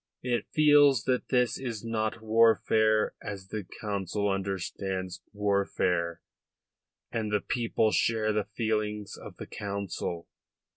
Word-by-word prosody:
It 120 -3 -1
feels 145 -5 +5
that 125 -1 0
this 125 -2 +2
is 115 -4 -5
not 110 0 -2
warfare 110 -1 +4
as 95 -2 -7
the 105 -1 -4 0.2
Council 100 -1 -1
understands 95 -1 -3
warfare, 100 -4 0 0.9
and 110 -2 -2
the 105 - +2
people 115 -1 0
share 110 -1 +2
the 105 -1 0
feelings 105 -2 -1
of - - -11
the - - -7
Council. 100 -4 -4
105 Hz, 115 wpm, -29 LUFS, 100-115 Hz, 0.9 s, feels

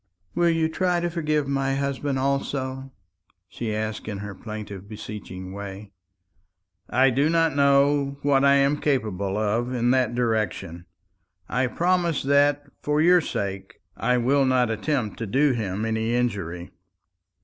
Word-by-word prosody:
"Will 175 0 +3
you 165 -1 +2
try 180 +2 0
to 175 0 -2
forgive 155 -4 0
my 135 -1 0
husband 140 0 -2
also?" 135 0 -2 0.6
she 110 +5 -5
asked 110 0 -3
in 105 -2 -4
her 100 0 -6
plaintive 105 -2 -8
beseeching 100 -4 -8
way. 100 0 -8 1.0
"I 130 +2 +4
do 140 +5 +2
not 165 -3 +2
know 140 0 +3
what 140 -1 +3
I 140 0 +6
am 140 +1 +3
capable 105 -8 -1
of 110 +4 0
in 120 -1 +1
that 125 -3 +2
direction. 105 -7 -1 0.6
I 125 +1 0
promise 175 +2 +1
that, 145 +1 +3 0.2
for 150 0 0
your 175 +2 +5
sake, 100 -8 -4 0.2
I 125 +2 +1
will 135 +4 +3
not 130 -3 +2
attempt 110 0 -2
to 115 - -3
do 140 +7 +3
him 105 -3 -2
any 110 +1 0
injury." 100 -8 -2
130 Hz, 145 wpm, -24 LUFS, 105-140 Hz, 1.0 s, I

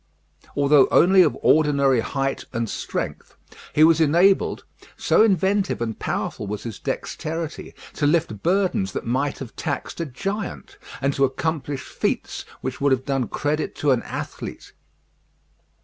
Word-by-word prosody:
Although 140 -1 +5
only 190 +2 +6
of - - +3
ordinary 140 -4 +4
height 135 +3 -2
and 115 -1 -1
strength, - - -5 0.3
he 155 - +4
was 165 0 +5
enabled, 175 +6 +3 0.3
so - - +3
inventive 195 -1 +2
and 115 -2 -3
powerful 105 - -3
was 105 +1 -4
his 115 -4 -6
dexterity, 160 0 -4 0.2
to 145 - 0
lift 150 - 0
burdens 180 - +1
that - - -4
might 135 +4 -1
have 125 -4 -9
taxed 160 +2 -4
a 165 - -2
giant, 195 - -5 0.2
and 140 +1 +2
to 140 - +1
accomplish 145 0 -1
feats - - -3 0.2
which - - -5
would 140 0 +3
have 130 0 +1
done 135 -4 0
credit 150 +7 -2
to 145 - +1
an 125 -2 +2
athlete. - - -7
145 Hz, 145 wpm, -23 LUFS, 130-165 Hz, 0.3 s, only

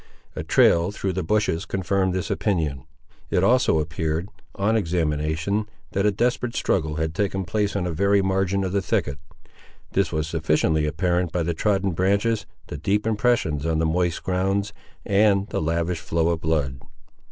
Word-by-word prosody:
A - - -3
trail 85 +2 +4
through 100 -2 -3
the 95 - -1
bushes 90 -1 0
confirmed 95 0 0
this 95 - -2
opinion. 80 - -1 0.4
It 90 - +1
also 120 -5 +4
appeared, 80 +3 -2 0.3
on 105 +3 +1
examination, 85 +2 0 0.2
that 100 +2 +1
a - - +4
desperate 120 +3 -1
struggle 80 -4 0
had 80 0 -2
taken 95 +1 -1
place 100 +4 -1
on 100 - 0
the 90 - -2
very 100 +4 +2
margin 95 0 +1
of 95 - -2
the 100 +1 +1
thicket. 70 -5 -1 0.7
This 95 -4 +1
was 80 -1 -1
sufficiently 80 -1 +1
apparent 90 +2 0
by 85 -1 0
the 85 +1 -1
trodden 100 +2 +1
branches, 100 +4 +1 0.2
the - - -7
deep 100 +7 0
impressions 110 - +1
on 80 -1 0
the 80 - +1
moist 85 +1 0
ground, 95 +2 0 0.3
and 100 0 +3
the - - -2
lavish 85 +2 -1
flow 85 0 0
of 85 -1 -1
blood. 75 -5 -1
90 Hz, 165 wpm, -24 LUFS, 80-100 Hz, 0.7 s, trail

